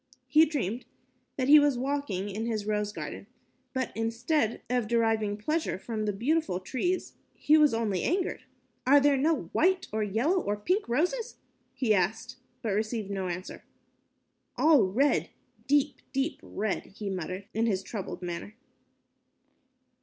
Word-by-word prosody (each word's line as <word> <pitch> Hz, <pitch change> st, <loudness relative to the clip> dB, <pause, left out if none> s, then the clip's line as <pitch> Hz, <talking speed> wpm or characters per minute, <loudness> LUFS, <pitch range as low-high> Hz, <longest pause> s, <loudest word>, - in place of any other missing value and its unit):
He 310 Hz, +1 st, +6 dB
dreamed 245 Hz, -, -3 dB, 0.5 s
that 260 Hz, -2 st, -1 dB
he 300 Hz, +2 st, +9 dB
was 290 Hz, -3 st, +3 dB
walking 265 Hz, -7 st, -2 dB
in 215 Hz, +3 st, -3 dB
his 215 Hz, -3 st, -2 dB
rose 210 Hz, -1 st, -1 dB
garden, 200 Hz, -, -7 dB, 0.4 s
but 260 Hz, -2 st, -2 dB
instead 230 Hz, +3 st, 0 dB
of 245 Hz, -2 st, 0 dB
deriving 225 Hz, -3 st, +1 dB
pleasure 305 Hz, -, -1 dB
from 215 Hz, +2 st, -4 dB
the 210 Hz, -, +1 dB
beautiful 260 Hz, -, 0 dB
trees, 315 Hz, -, -2 dB, 0.2 s
he 305 Hz, -, +4 dB
was 300 Hz, -2 st, +6 dB
only 220 Hz, -5 st, 0 dB
angered. 355 Hz, -6 st, -1 dB, 0.4 s
"Are 285 Hz, +2 st, +7 dB
there 285 Hz, 0 st, +4 dB
no 275 Hz, -, 0 dB
white, 370 Hz, +2 st, +3 dB
or 220 Hz, -, 0 dB
yellow, 235 Hz, -, +1 dB
or 205 Hz, -6 st, -2 dB
pink 365 Hz, -, 0 dB
roses?" 360 Hz, -, 0 dB, 0.4 s
he 235 Hz, -5 st, +2 dB
asked, 220 Hz, +7 st, -1 dB, 0.3 s
but 220 Hz, -, -1 dB
received 215 Hz, 0 st, -2 dB
no 190 Hz, -2 st, -2 dB
answer. 180 Hz, +1 st, -6 dB, 0.9 s
"All 305 Hz, -4 st, +6 dB
red, 260 Hz, +8 st, +2 dB, 0.4 s
deep, 285 Hz, -1 st, +2 dB
deep 270 Hz, +3 st, -1 dB
red," 210 Hz, -1 st, -3 dB
he 205 Hz, -2 st, -3 dB
muttered, 185 Hz, +1 st, -4 dB
in 225 Hz, +2 st, +1 dB
his 195 Hz, -3 st, 0 dB
troubled 195 Hz, -4 st, -6 dB
manner. 175 Hz, +4 st, -5 dB
230 Hz, 145 wpm, -29 LUFS, 205-290 Hz, 0.9 s, he